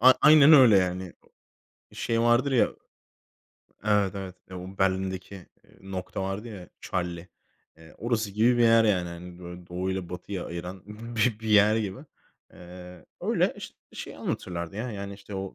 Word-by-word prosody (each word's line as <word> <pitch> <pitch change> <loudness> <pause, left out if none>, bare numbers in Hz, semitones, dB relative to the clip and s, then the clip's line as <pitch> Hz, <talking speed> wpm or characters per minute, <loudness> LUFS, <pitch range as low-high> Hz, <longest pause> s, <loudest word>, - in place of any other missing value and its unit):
A 130 +2 +9
aynen 150 0 +8
öyle 130 -8 +8
yani. 90 -1 -2 0.8
Şey 115 0 -1
vardır 120 +4 +3
ya. 125 - +3 1.1
Evet, 105 -2 +2
evet, 95 -2 -7
eee, 95 - -7
o 95 +2 -9
Berlin’deki, 95 0 -1
eee, 95 -3 -16
nokta 95 0 -5
vardı 95 +4 -4
ya, 95 -6 -10
Charlie, 90 0 -4 0.5
eee, 80 -1 -16
orası 110 -2 -1
gibi 115 +4 +3
bir - - +4
yer 115 -1 +6
yani. 90 -5 +1
Hani 85 +1 -10
böyle 90 0 -10
doğu 90 +2 -3
ile 95 -2 -4
batıya 90 +1 -6
ayıran 90 +2 -7 0.3
bi 110 0 +1
bir 110 - -5
yer 105 0 +5
gibi, 100 -4 -3 0.5
eee, 90 0 -12
öyle - - +1
iş - - -9 0.2
şey - - -8
anlatırlardı 85 +1 -4
ya, 120 +3 -3
yani, 100 0 -6
işte, 100 0 -11
o, 95 0 -5
95 Hz, 160 wpm, -27 LUFS, 90-110 Hz, 1.1 s, A